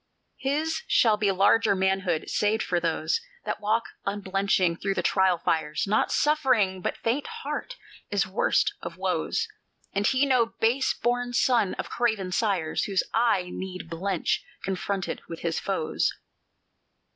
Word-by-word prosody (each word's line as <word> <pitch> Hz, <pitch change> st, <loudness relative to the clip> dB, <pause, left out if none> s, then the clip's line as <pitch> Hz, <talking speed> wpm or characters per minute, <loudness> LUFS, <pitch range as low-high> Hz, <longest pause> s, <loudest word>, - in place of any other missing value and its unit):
"His 315 Hz, +4 st, -1 dB
shall 220 Hz, -3 st, +4 dB
be 205 Hz, -1 st, +1 dB
larger 200 Hz, +3 st, +4 dB
manhood, 190 Hz, -3 st, 0 dB
saved 215 Hz, +1 st, +1 dB
for 175 Hz, -, 0 dB
those 165 Hz, -, 0 dB, 0.2 s
That -, -, -3 dB
walk 220 Hz, +2 st, +1 dB, 0.2 s
unblenching 195 Hz, -3 st, 0 dB
through 195 Hz, +1 st, -1 dB
the 175 Hz, -, -1 dB
trial 190 Hz, -1 st, +3 dB
fires; 160 Hz, -2 st, 0 dB
Not 210 Hz, +2 st, +1 dB
suffering, 255 Hz, -11 st, +2 dB
but -, -, -2 dB
faint 250 Hz, -, -1 dB, 0.2 s
heart, -, -, -4 dB, 0.3 s
is 205 Hz, -1 st, +1 dB
worst 190 Hz, +3 st, +1 dB
of -, -, -7 dB
woes, 460 Hz, -, -1 dB, 0.5 s
And 200 Hz, +1 st, +1 dB
he 265 Hz, +2 st, +3 dB
no 255 Hz, -4 st, +3 dB
base 245 Hz, +4 st, +2 dB
born 245 Hz, +1 st, -1 dB
son 235 Hz, -5 st, +2 dB
of -, -, -6 dB
craven 220 Hz, -6 st, 0 dB
sires, 180 Hz, -6 st, 0 dB
Whose 195 Hz, -2 st, +1 dB
eye 205 Hz, -6 st, +2 dB
need 185 Hz, -3 st, -6 dB
blench 180 Hz, +2 st, -1 dB, 0.2 s
confronted 190 Hz, 0 st, -2 dB
with 165 Hz, -, -7 dB
his 165 Hz, -1 st, -1 dB
foes. 190 Hz, -5 st, 0 dB
200 Hz, 145 wpm, -26 LUFS, 185-235 Hz, 0.5 s, shall